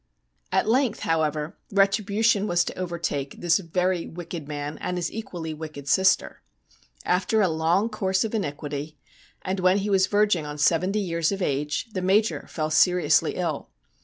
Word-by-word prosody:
At - - +1
length, 240 -1 +1
however, 155 -1 -1
retribution 200 +2 +2
was 175 -2 +2
to - - -4
overtake 170 -6 -3
this 170 0 +3
very 180 0 -1
wicked 170 -3 -7
man 145 0 -5
and 180 - -3
his 175 -1 -2
equally 175 -7 -5
wicked 155 -2 -8
sister. 190 +4 +2 0.6
After 195 +5 +1
a 200 - +4
long 165 +5 +1
course 190 -4 0
of 225 - -4
iniquity, 150 -5 -4 0.5
and 185 +1 -2
when 185 +1 +4
he 205 +1 -1
was 190 -1 +4
verging 205 -5 +2
on 150 0 -6
seventy 180 +7 +2
years 170 -3 0
of 195 - -3
ago, 145 0 -1 0.2
tho 185 - -2
Major 200 +4 +1
fell 155 -1 -3
seriously 180 +3 +3
ill. - - -3
180 Hz, 160 wpm, -25 LUFS, 155-195 Hz, 0.6 s, a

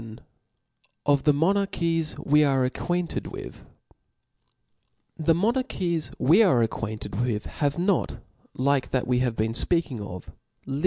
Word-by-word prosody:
VIL 110 -1 -10
I - - -20 0.8
Of 145 -2 +3
the 150 - +6
Monarchies 165 -1 +1
we 150 +1 +3
are 135 -3 +2
acquainted 175 +6 -2
witL - - -8 1.6
Book 155 - -6
T^HE 165 - +6
monarchies 185 - -1
we 170 - +5
are 150 - +4
acquainted 110 -1 -4
with 115 -4 -1
have 145 -2 -1
XL 170 - -4
A - - 0
not, 195 -3 +1 0.4
like 135 +1 +1
that 130 -2 0
we 125 0 +1
have 125 -2 0
been 110 +1 -1
fpeaking 145 -3 0
of* 90 -3 -7 0.4
Chap. 135 - -4
145 Hz, 155 wpm, -25 LUFS, 120-170 Hz, 1.6 s, the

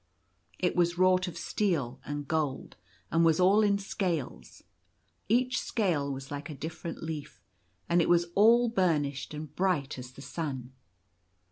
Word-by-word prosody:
It 180 - 0
was 175 0 +2
wrought 185 0 +4
of 175 - -6
steel 160 - -1
and 145 -1 -5
gold, 150 -4 -2 0.4
and 165 - +3
was 165 0 +4
all 195 +4 +5
in 205 -1 +3
scales. 165 - -4 0.7
Each 250 +3 +2
scale 165 -11 0
was 135 0 -7
like 145 +3 -5
a 150 - -6
different 160 +3 -6
leaf; 160 -3 -6 0.5
and 170 +1 +3
it - - +1
was 175 0 +4
all 230 +5 +6
bur 185 -8 +2
nished 140 -2 -4
and 150 -1 -8
bright 160 -8 0
as 125 0 -9
the 135 - -11
sun. 135 -7 -5
165 Hz, 155 wpm, -29 LUFS, 140-185 Hz, 0.7 s, all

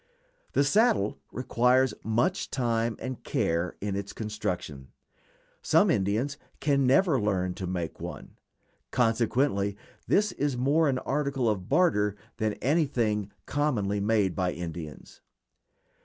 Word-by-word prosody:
The - - +4
saddle 145 - +2
requires 125 0 +2
much 120 - 0
time 115 -3 0
and 130 -1 -6
care 85 +2 -1
in 100 -1 -2
its 100 0 -4
construction; 90 - -4 0.7
some - - +4
Indians 110 +9 0 0.2
can 140 -3 +2
never 140 - +4
learn 95 -3 0
to 95 0 -5
make 85 -3 -4
one; - - -7 0.6
consequently 115 -3 +1 0.3
this 210 -1 +3
is 140 -3 -1
more 145 +5 +3
an 130 - +1
article 135 -2 -1
of 100 -4 -1
barter 135 - +3 0.2
than 110 -1 0
anything 120 - +1
commonly 115 -9 0
made 100 -3 +1
by 90 -2 0
Indians. 80 -4 -8
115 Hz, 120 wpm, -28 LUFS, 100-140 Hz, 0.7 s, The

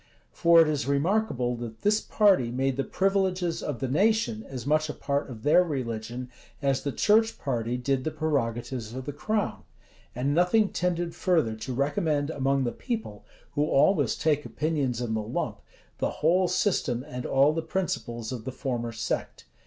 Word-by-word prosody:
For 170 -1 +5
it - - -1
is 150 -3 -1
remarkable, 140 - +1
that 115 -2 -8
this 210 +1 +3
party 195 - +3
made 130 +2 0
the 135 - 0
privileges 190 -2 0
of 145 -5 -4
the 135 - 0
nation 145 - +1
as 125 -3 -6
much 155 +1 +2
a - - -4
part 140 0 -2
of 115 -4 -9
their 165 +5 +5
religion, 125 -4 -4 0.3
as 135 -2 +1
the 140 - -2
church 220 - +3
party 120 -3 -2
did 130 +1 0
the 155 - -1
prerogatives 130 -6 -2
of 130 0 -5
the 145 - -4
crown: 150 - -2 0.5
and 135 +4 0
nothing 180 +6 +3
tended 175 -1 -1
further 160 - +1
to 125 +4 -5
recommend 145 +2 0
among 135 -1 +1
the 120 - -1
people, 220 - -5 0.3
who 145 +1 +1
always 155 +6 +3
take 150 -2 +1
opinions 145 -7 -1
in 120 -2 -2
the 110 - 0
lump, 105 - -3 0.4
the - - +1
whole 180 +4 +2
system 175 - 0
and 125 -3 -5
all 140 +3 +4
the 165 - -1
principles 135 -10 -3
of 125 -3 -5
the 130 - -4
former 120 -3 -3
sect. - - -4
140 Hz, 175 wpm, -27 LUFS, 125-170 Hz, 0.5 s, For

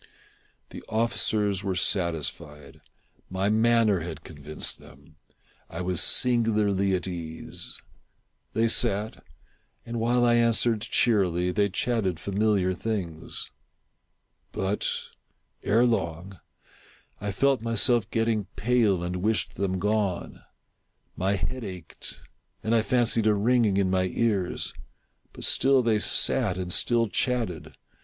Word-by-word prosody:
The - - -9
officers 105 -3 +1
were 95 -1 -1
satisfied. 80 -6 -2 0.5
My 95 +2 0
manner 110 -2 +3
had 80 -1 -7
convinced 75 -2 -6
them. 75 +4 -18 0.5
I 85 - -5
was 90 -2 0
singularly 105 -5 +3
at 90 - -3
ease. 80 -3 -6 0.7
They 115 +1 +2
sat, 105 -4 0 0.6
and 115 0 -4
while 120 +2 +2
I 120 - +4
answered 115 -1 +3
cheerily, 90 -7 +1
they 100 +2 +1
chatted 95 -4 -1
familiar 100 -1 +1
things. 90 -6 -4 1.0
But, 95 +2 -1 0.7
ere 115 +4 +3
long, 90 -4 -2 0.8
I 105 0 -3
felt 135 +5 +2
myself 115 -1 +2
getting 115 -3 0
pale 110 -6 +2
and 90 +1 -3
wished 105 +4 -1
them 95 -1 -1
gone. 105 -1 -1 0.7
My 95 +2 0
head 130 +6 -3
ached, 90 -4 -8 0.4
and 110 +1 0
I 115 - +4
fancied 115 0 +2
a 105 - +4
ringing 110 -1 +2
in 95 -2 +2
my 95 -1 +2
ears: 100 -2 -1 0.6
but - - -8
still 135 -1 +3
they 110 -2 +2
sat 105 -2 +1
and 90 -1 -2
still 120 -1 +2
chatted. 115 -6 -2
100 Hz, 120 wpm, -26 LUFS, 90-115 Hz, 1.0 s, I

